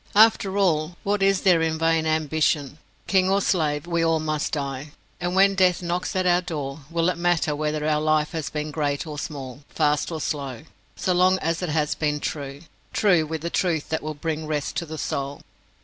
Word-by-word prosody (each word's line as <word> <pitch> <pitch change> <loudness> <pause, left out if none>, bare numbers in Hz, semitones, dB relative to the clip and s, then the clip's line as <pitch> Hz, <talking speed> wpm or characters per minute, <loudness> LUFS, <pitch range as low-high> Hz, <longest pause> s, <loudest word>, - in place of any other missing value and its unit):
After 205 -2 +5
all, 175 -3 +1
what 205 0 0
is 195 -1 +3
there 180 -4 +4
in 160 -1 0
vain 165 0 +2
ambition? 155 -2 0 0.3
King 190 -1 +3
or 195 +1 +3
slave, 155 -6 0
we 170 -1 0
all 165 -1 +2
must 155 -1 -2
die, 140 0 -4 0.3
and 175 +1 -2
when 195 +1 +5
death 185 -2 +2
knocks 175 +2 -2
at 185 -1 +1
our 175 0 +4
door, 150 -5 -5
will 165 0 +1
it 180 -2 0
matter 170 -3 +1
whether 150 0 -1
our 150 -1 +2
life 155 -1 +2
has 160 -3 -3
been 150 0 -4
great 145 0 -1
or 150 -2 -6
small, 140 -3 -6
fast 150 +1 +1
or 160 - -3
slow, 140 -4 -4 0.3
so 185 - 0
long 185 +1 +4
as 165 -1 -1
it 180 - -2
has 150 0 +1
been 150 -1 -1
true 140 -1 -5 0.3
true 180 -7 +3
with 160 0 -4
the 170 +1 -3
truth 165 -5 0
that 160 - -1
will 155 0 -5
bring 155 +1 -3
rest 150 -2 -2
to 170 - -2
the 155 +1 -6
soul? 140 -1 -3
160 Hz, 205 wpm, -24 LUFS, 150-175 Hz, 0.3 s, After